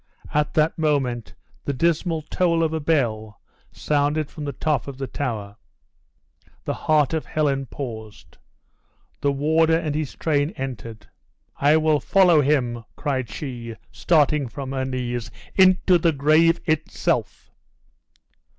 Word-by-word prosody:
At 150 Hz, 0 st, 0 dB
that 155 Hz, +1 st, +2 dB
moment 135 Hz, -7 st, -1 dB, 0.3 s
the 140 Hz, -, -1 dB
dismal 165 Hz, +2 st, 0 dB
toll 170 Hz, +1 st, +1 dB
of 160 Hz, -1 st, 0 dB
a 160 Hz, -, -1 dB
bell 115 Hz, -9 st, -1 dB, 0.3 s
sounded 150 Hz, +1 st, 0 dB
from 150 Hz, -, -7 dB
the 140 Hz, -, -2 dB
top 145 Hz, 0 st, -1 dB
of 140 Hz, -2 st, -7 dB
the 135 Hz, -, -3 dB
Tower. 110 Hz, -7 st, -4 dB, 1.1 s
The -, -, -1 dB
heart 150 Hz, -2 st, +1 dB
of 160 Hz, -, -2 dB
Helen 140 Hz, -3 st, 0 dB
paused. 110 Hz, -6 st, -8 dB, 0.8 s
The 140 Hz, -, +1 dB
warden 160 Hz, +3 st, +2 dB
and 150 Hz, -, -1 dB
his 150 Hz, -2 st, -3 dB
train 150 Hz, 0 st, 0 dB
entered. 115 Hz, -5 st, -6 dB, 0.5 s
"I 145 Hz, +3 st, +4 dB
will 155 Hz, -1 st, +2 dB
follow 180 Hz, 0 st, +4 dB
him," 125 Hz, -5 st, 0 dB
cried 130 Hz, -6 st, -2 dB
she, 120 Hz, -3 st, -6 dB, 0.2 s
starting 150 Hz, -4 st, +2 dB
from 135 Hz, +3 st, -6 dB
her 130 Hz, -1 st, -2 dB
knees, 120 Hz, -3 st, -3 dB, 0.2 s
"into 185 Hz, -1 st, +5 dB
the 165 Hz, -1 st, +2 dB
grave 155 Hz, +4 st, +3 dB
itself!" 155 Hz, -1 st, -1 dB
145 Hz, 130 wpm, -23 LUFS, 130-155 Hz, 1.1 s, into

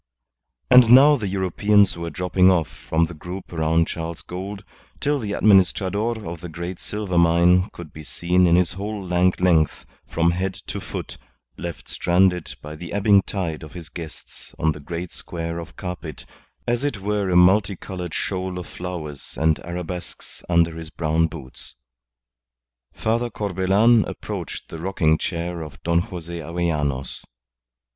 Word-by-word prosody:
And 125 Hz, -2 st, +8 dB
now 140 Hz, +5 st, +8 dB
the 110 Hz, -7 st, -3 dB
Europeans 100 Hz, +2 st, +3 dB
were 85 Hz, 0 st, -4 dB
dropping 90 Hz, +1 st, +3 dB
off 85 Hz, -5 st, +3 dB, 0.2 s
from 80 Hz, +1 st, +3 dB
the 85 Hz, -, -8 dB
group 90 Hz, +4 st, -8 dB
around 80 Hz, 0 st, +2 dB
Charles 80 Hz, 0 st, -5 dB
Gould 95 Hz, +3 st, -6 dB, 0.4 s
till 145 Hz, 0 st, +1 dB
the 105 Hz, -4 st, -3 dB
Administrador 105 Hz, +3 st, +3 dB
of 85 Hz, 0 st, -6 dB
the 90 Hz, -, -7 dB
Great 85 Hz, +2 st, -6 dB
Silver 100 Hz, -4 st, -1 dB
Mine 85 Hz, +3 st, +4 dB
could 85 Hz, -4 st, -10 dB
be 75 Hz, -, -9 dB
seen 90 Hz, +4 st, +2 dB
in 85 Hz, -, +5 dB
his 90 Hz, -1 st, +3 dB
whole 100 Hz, +1 st, -5 dB
lank 90 Hz, +1 st, +2 dB
length, 85 Hz, -4 st, +2 dB, 0.2 s
from 85 Hz, +1 st, +2 dB
head 95 Hz, +2 st, -2 dB
to -, -, -6 dB
foot, -, -, -7 dB, 0.4 s
left 85 Hz, -1 st, -7 dB
stranded 90 Hz, -1 st, +1 dB
by 75 Hz, +1 st, -7 dB
the 85 Hz, +2 st, -8 dB
ebbing 100 Hz, 0 st, +5 dB
tide 90 Hz, -6 st, -3 dB
of 75 Hz, -1 st, -10 dB
his 85 Hz, -3 st, -9 dB
guests 80 Hz, -1 st, -10 dB
on 80 Hz, -, +2 dB
the 75 Hz, -, -6 dB
great 85 Hz, +4 st, -5 dB
square 85 Hz, -1 st, -5 dB
of 85 Hz, 0 st, -9 dB
carpet, 90 Hz, -4 st, -6 dB, 0.4 s
as 120 Hz, +2 st, 0 dB
it 145 Hz, -8 st, -1 dB
were 100 Hz, 0 st, -1 dB
a 90 Hz, -, +1 dB
multi 95 Hz, +3 st, +5 dB
coloured 90 Hz, -2 st, -6 dB
shoal 95 Hz, -1 st, -2 dB
of 90 Hz, -, -5 dB
flowers 85 Hz, -6 st, -7 dB
and 80 Hz, 0 st, +2 dB
arabesques 90 Hz, 0 st, -6 dB
under 85 Hz, -1 st, +3 dB
his 80 Hz, -1 st, -7 dB
brown 80 Hz, +1 st, +1 dB
boots. 75 Hz, -6 st, -10 dB, 1.2 s
Father 115 Hz, +2 st, -1 dB
Corbelan 105 Hz, +3 st, +3 dB
approached -, -, -6 dB
the 80 Hz, -, -7 dB
rocking 80 Hz, -3 st, +1 dB
chair 85 Hz, -1 st, -3 dB
of 75 Hz, -2 st, -9 dB
Don 85 Hz, 0 st, +3 dB
Jose 85 Hz, -1 st, -5 dB
Avellanos. 75 Hz, -5 st, -2 dB
90 Hz, 155 wpm, -23 LUFS, 85-95 Hz, 1.2 s, And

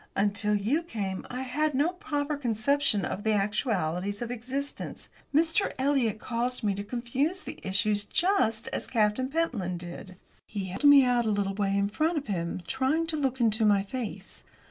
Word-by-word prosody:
Until 210 Hz, +1 st, +2 dB
you 235 Hz, +11 st, +1 dB
came 205 Hz, -, -4 dB
I 250 Hz, +1 st, -4 dB
had 295 Hz, +3 st, 0 dB
no 290 Hz, +5 st, +3 dB
proper 300 Hz, -4 st, -2 dB
conception 240 Hz, -, +1 dB
of 205 Hz, -, -4 dB
the 220 Hz, -, +2 dB
actualities 200 Hz, -, 0 dB
of 240 Hz, -, -5 dB
existence. 260 Hz, +4 st, -5 dB, 0.2 s
Mr. 325 Hz, +6 st, +2 dB
Eliot 260 Hz, -5 st, +1 dB
caused 245 Hz, +2 st, -2 dB
me 205 Hz, -2 st, +2 dB
to 200 Hz, +1 st, -4 dB
confuse 255 Hz, -, -1 dB
the -, -, -8 dB
issues 205 Hz, +2 st, +1 dB
just 265 Hz, -, +1 dB
as 270 Hz, -, -2 dB
Captain 225 Hz, +3 st, +1 dB
Pentland 245 Hz, -, -1 dB
did." 175 Hz, +2 st, -8 dB, 0.3 s
He 200 Hz, -3 st, -4 dB
held 190 Hz, +9 st, -4 dB
me 285 Hz, -1 st, +9 dB
out 245 Hz, -2 st, +2 dB
a -, -, +2 dB
little 200 Hz, -2 st, 0 dB
way 200 Hz, 0 st, 0 dB
in 200 Hz, 0 st, +2 dB
front 310 Hz, +11 st, 0 dB
of 290 Hz, -, -2 dB
him, 175 Hz, -3 st, -3 dB
trying 265 Hz, -, +1 dB
to 325 Hz, -1 st, -2 dB
look 265 Hz, -3 st, -1 dB
into 225 Hz, -1 st, +2 dB
my 205 Hz, -2 st, +4 dB
face. 230 Hz, +2 st, -6 dB
230 Hz, 175 wpm, -28 LUFS, 205-280 Hz, 0.3 s, me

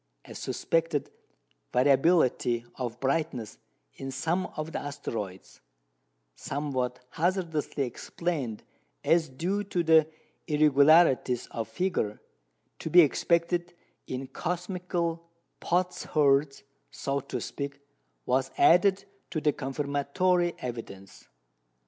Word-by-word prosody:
A -, -, -10 dB
suspected 165 Hz, -3 st, -1 dB, 0.6 s
variability 130 Hz, -3 st, +3 dB
of 120 Hz, -2 st, -5 dB
brightness 135 Hz, -4 st, -2 dB, 0.3 s
in 135 Hz, -, -7 dB
some 170 Hz, +7 st, -1 dB
of 155 Hz, +1 st, -4 dB
the -, -, -3 dB
asteroids, 110 Hz, -9 st, -6 dB, 0.7 s
somewhat 130 Hz, -, -3 dB
hazardously 165 Hz, -4 st, -1 dB
explained 130 Hz, -1 st, -3 dB, 0.4 s
as 165 Hz, -2 st, +3 dB
due 180 Hz, +10 st, -2 dB
to 180 Hz, -3 st, -1 dB
the 160 Hz, -1 st, +5 dB, 0.4 s
irregularities 150 Hz, -3 st, +4 dB
of 115 Hz, -1 st, -3 dB
figure 180 Hz, -, -1 dB, 0.6 s
to -, -, -4 dB
be 175 Hz, +3 st, +8 dB
expected 170 Hz, +3 st, +1 dB, 0.3 s
in 130 Hz, +1 st, -4 dB
cosmical 175 Hz, +2 st, -3 dB, 0.3 s
potsherds 150 Hz, -5 st, +1 dB, 0.3 s
(so 140 Hz, 0 st, -2 dB
to -, -, -5 dB
speak), 140 Hz, -1 st, -5 dB, 0.5 s
was 130 Hz, +1 st, +1 dB
added 190 Hz, +3 st, +5 dB, 0.2 s
to 160 Hz, -, -2 dB
the 150 Hz, -1 st, +2 dB
confirmatory 145 Hz, +6 st, 0 dB
evidence. 115 Hz, -6 st, -8 dB
150 Hz, 95 wpm, -28 LUFS, 130-170 Hz, 0.7 s, be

